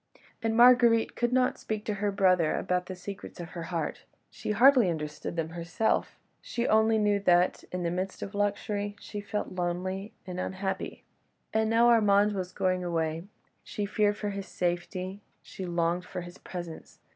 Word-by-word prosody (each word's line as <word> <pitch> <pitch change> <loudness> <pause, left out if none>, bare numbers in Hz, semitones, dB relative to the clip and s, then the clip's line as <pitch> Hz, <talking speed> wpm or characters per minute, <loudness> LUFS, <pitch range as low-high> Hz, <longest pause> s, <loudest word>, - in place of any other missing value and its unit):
And 225 -1 0
Marguerite 240 -2 +6
could 240 0 0
not 255 0 +2
speak 215 -1 -4
to 210 - -1
her 205 -1 +1
brother 185 -5 +3
about 180 0 -1
the 185 - -5
secrets 190 +1 -8
of 170 -1 -6
her 175 - -7
heart; 165 -4 -3 0.3
she - - -7
hardly 245 0 +6
understood 150 -1 -4
them 165 -1 -2
herself, 170 +6 -1 0.2
she 235 - -3
only 220 +1 +4
knew 205 -1 +2
that, 180 -2 +3
in 180 -1 -3
the 170 - 0
midst 185 +2 -3
of 200 - -7
luxury, 205 0 -1
she 205 0 -6
felt 210 0 -3
lonely 185 +4 -3
and 180 0 -5
unhappy. 190 +1 -3 0.5
And 220 0 +2
now 230 +1 +5
Armand 210 -3 +5
was 185 -2 -3
going 185 -1 0
away; 165 -1 -1 0.4
she 205 - -3
feared 205 0 +1
for 210 -1 -3
his 195 -1 -5
safety, 185 +2 -3 0.2
she 190 - -7
longed 175 +1 0
for 180 - -5
his 175 +1 -10
presence. 175 -3 -8
190 Hz, 170 wpm, -29 LUFS, 175-210 Hz, 0.5 s, Marguerite